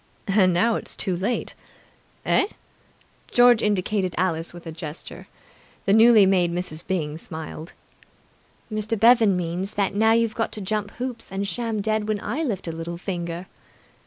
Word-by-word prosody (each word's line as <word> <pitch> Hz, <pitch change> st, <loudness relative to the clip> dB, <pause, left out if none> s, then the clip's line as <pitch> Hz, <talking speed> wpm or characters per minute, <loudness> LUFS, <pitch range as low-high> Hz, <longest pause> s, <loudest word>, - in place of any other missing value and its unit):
"And 195 Hz, -2 st, +4 dB
now 220 Hz, +7 st, +2 dB
it's -, -, -7 dB
too 185 Hz, -, -1 dB
late!" 200 Hz, +8 st, -2 dB, 0.7 s
"Eh?" 400 Hz, -, +3 dB, 0.8 s
George 245 Hz, -2 st, +6 dB
indicated 200 Hz, -2 st, 0 dB
Alice 165 Hz, -2 st, -1 dB
with 175 Hz, 0 st, -12 dB
a 165 Hz, -, -6 dB
gesture. 160 Hz, -1 st, -9 dB, 0.6 s
The 195 Hz, -, +3 dB
newly 220 Hz, -1 st, +7 dB
made 180 Hz, -3 st, +3 dB
Mrs. 175 Hz, -2 st, -4 dB
Byng 155 Hz, -4 st, -2 dB
smiled. 160 Hz, 0 st, -8 dB, 1.0 s
"Mr. 215 Hz, +1 st, -1 dB
Bevan 225 Hz, -4 st, +5 dB
means 180 Hz, +3 st, -3 dB
that 200 Hz, -1 st, 0 dB
now 220 Hz, +2 st, +4 dB
you've 230 Hz, -1 st, +2 dB
got 225 Hz, -, -2 dB
to -, -, -5 dB
jump 210 Hz, +1 st, -2 dB
through 245 Hz, +4 st, -5 dB
hoops 245 Hz, -3 st, -8 dB
and 195 Hz, +1 st, -3 dB
sham 225 Hz, -1 st, -2 dB
dead 215 Hz, 0 st, 0 dB
when 215 Hz, -1 st, 0 dB
I 250 Hz, +10 st, -3 dB
lift 210 Hz, -, -2 dB
a -, -, -2 dB
little 165 Hz, +1 st, -6 dB
finger!" 175 Hz, -1 st, -4 dB
195 Hz, 160 wpm, -24 LUFS, 175-220 Hz, 1.0 s, newly